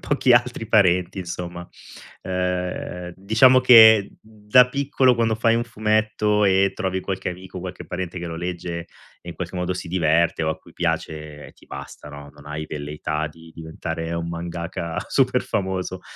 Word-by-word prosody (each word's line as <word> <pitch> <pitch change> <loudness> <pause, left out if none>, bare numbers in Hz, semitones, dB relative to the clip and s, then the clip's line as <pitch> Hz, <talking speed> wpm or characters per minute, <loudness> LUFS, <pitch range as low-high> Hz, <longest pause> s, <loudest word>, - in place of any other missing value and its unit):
pochi 135 -3 +2
altri 120 -1 +2
parenti, 90 -3 +2
insomma. 85 -1 -6 0.5
Ehm, 90 -1 -3
diciamo 110 +7 +5
che 110 -5 +7
da 110 +3 +3
piccolo, 135 -2 +2
quando 115 -1 +1
fai 115 +1 +2
un 120 +1 0
fumetto 110 -1 +1
e 95 0 +3
trovi 95 0 -2
qualche 95 -1 -4
amico, 90 0 -8
qualche 90 0 -8
parente 90 0 -5
che 85 - -5
lo 80 0 -6
legge, 85 0 -4 0.4
e 85 - -13
in 85 - -6
qualche 90 0 -6
modo 90 0 -2
si 90 - -6
diverte 85 -1 +1
o 80 - 0
a 80 - -1
cui - - -19
piace, 75 -3 -4
ti - - -22
basta, 70 +1 -9
no, 70 0 -11
non 75 0 -16
hai 75 +1 -5
velleità 75 +1 -4
di 80 +1 -16
diventare 80 0 -5
un 85 0 -3
mangaka 85 0 -5
super - - +2
famoso. 95 -1 -3
90 Hz, 165 wpm, -22 LUFS, 85-105 Hz, 0.5 s, che